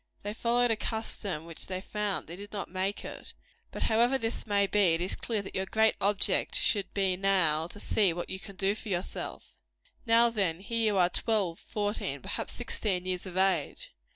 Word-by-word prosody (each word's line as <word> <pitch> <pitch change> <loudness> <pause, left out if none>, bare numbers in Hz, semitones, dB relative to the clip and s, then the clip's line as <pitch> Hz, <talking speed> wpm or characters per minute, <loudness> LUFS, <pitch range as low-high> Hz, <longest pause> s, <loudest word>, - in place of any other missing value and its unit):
They 205 +1 -3
followed 240 +1 +2
a - - +3
custom 210 -7 -2
which 165 -1 -9
they 185 -1 -3
found; 210 +1 -2
they 170 - -8
did 205 +2 -10
not 200 -4 -5
make 190 +2 -2
it. - - -8 0.4
But - - -3
however 240 +4 +3
this 230 -2 -3
may 200 -1 +3
be, 195 -4 +4
it 165 - -3
is 180 - -2
clear 220 -4 -2
that - - -9
your 190 0 -1
great 220 +3 +3
object 200 0 +2
should 200 -3 +2
now 185 -5 +2
be, - - -12
to 205 - -10
see 205 -2 +3
what 175 +1 -4
you 190 - -4
can 200 0 -10
do 195 +1 +1
for 220 0 -8
yourself. 180 -1 -4 0.5
Now, 230 +1 +6
then, 190 -7 0
here 230 +3 -1
you - - 0
are, 180 -1 +5
twelve, 200 -7 0
fourteen, 205 -1 -2
perhaps - - -3
sixteen 185 -4 -2
years 185 0 -2
of 185 0 -6
age. 190 -6 +1
195 Hz, 200 wpm, -30 LUFS, 185-215 Hz, 0.5 s, Now